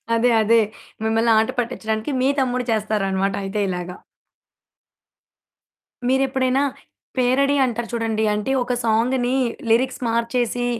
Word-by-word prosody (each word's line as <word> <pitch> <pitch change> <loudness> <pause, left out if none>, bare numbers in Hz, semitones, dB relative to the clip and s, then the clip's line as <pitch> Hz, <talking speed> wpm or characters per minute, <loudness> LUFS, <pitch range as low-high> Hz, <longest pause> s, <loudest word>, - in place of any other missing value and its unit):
అదే. 235 +2 +3
అదే. 230 +2 +4 0.4
మిమ్మల్ని 225 +1 +2
ఆట 220 0 +2
పట్టిచ్చడానికి, 220 0 -2
మీ 260 - +3
తమ్ముడు 250 -1 0
చేస్తారనమాట 200 -3 0
అయితే 195 +2 -3
ఇలాగా. 180 0 -4 2.1
మీరెప్పుడైనా 265 0 +1 0.5
పేరడి 265 +3 +2
అంటారు 235 -1 -3
చూడండి, 225 -2 -1
అంటే 210 +5 -2
ఒక 250 0 -2
సాంగ్‌ని 245 +3 +1 0.3
లిరిక్స్ 255 +4 +2
మార్చేసి 235 +1 0
230 Hz, 105 wpm, -21 LUFS, 220-255 Hz, 2.1 s, అదే